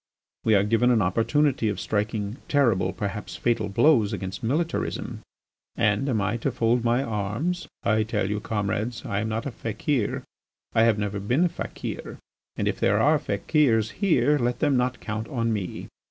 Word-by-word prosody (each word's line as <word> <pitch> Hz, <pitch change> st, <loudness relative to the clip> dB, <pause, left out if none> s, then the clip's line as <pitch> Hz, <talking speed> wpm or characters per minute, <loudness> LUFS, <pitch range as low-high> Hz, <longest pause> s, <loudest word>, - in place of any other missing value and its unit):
We 110 Hz, -2 st, +4 dB
are 100 Hz, -, +4 dB
given 115 Hz, +4 st, +3 dB
an 115 Hz, -4 st, +4 dB
opportunity 115 Hz, +6 st, +2 dB
of 105 Hz, -, -3 dB
striking 105 Hz, +1 st, -2 dB
terrible, 110 Hz, -10 st, +2 dB
perhaps 105 Hz, 0 st, -5 dB
fatal, 115 Hz, -3 st, 0 dB
blows 115 Hz, -1 st, +4 dB
against 95 Hz, 0 st, -5 dB
militarism. 155 Hz, +8 st, -2 dB, 0.6 s
And 110 Hz, +4 st, +1 dB
am 115 Hz, -4 st, +1 dB
I 105 Hz, +3 st, 0 dB
to 130 Hz, +4 st, -1 dB
fold 120 Hz, 0 st, +1 dB
my 120 Hz, +3 st, +2 dB
arms? 115 Hz, -, -2 dB, 0.2 s
I 110 Hz, 0 st, +2 dB
tell 105 Hz, -3 st, -1 dB
you, 105 Hz, +1 st, -1 dB
comrades, 110 Hz, +2 st, -2 dB
I 100 Hz, -, -1 dB
am 110 Hz, +1 st, -2 dB
not 110 Hz, +1 st, -2 dB
a 140 Hz, -, -3 dB
fakir, 115 Hz, +1 st, -2 dB, 0.5 s
I 115 Hz, -, +5 dB
have 115 Hz, -2 st, +3 dB
never 105 Hz, -1 st, -2 dB
been 120 Hz, -, +1 dB
a -, -, +2 dB
fakir, -, -, -6 dB, 0.4 s
and -, -, -1 dB
if -, -, -1 dB
there -, -, +3 dB
are -, -, +4 dB
fakirs 115 Hz, -7 st, +1 dB
here 155 Hz, -6 st, +3 dB
let 120 Hz, 0 st, 0 dB
them 145 Hz, -3 st, +2 dB
not 125 Hz, 0 st, 0 dB
count 110 Hz, +1 st, -4 dB
on 115 Hz, -3 st, -1 dB
me. 95 Hz, -5 st, -4 dB
115 Hz, 175 wpm, -25 LUFS, 105-125 Hz, 0.6 s, I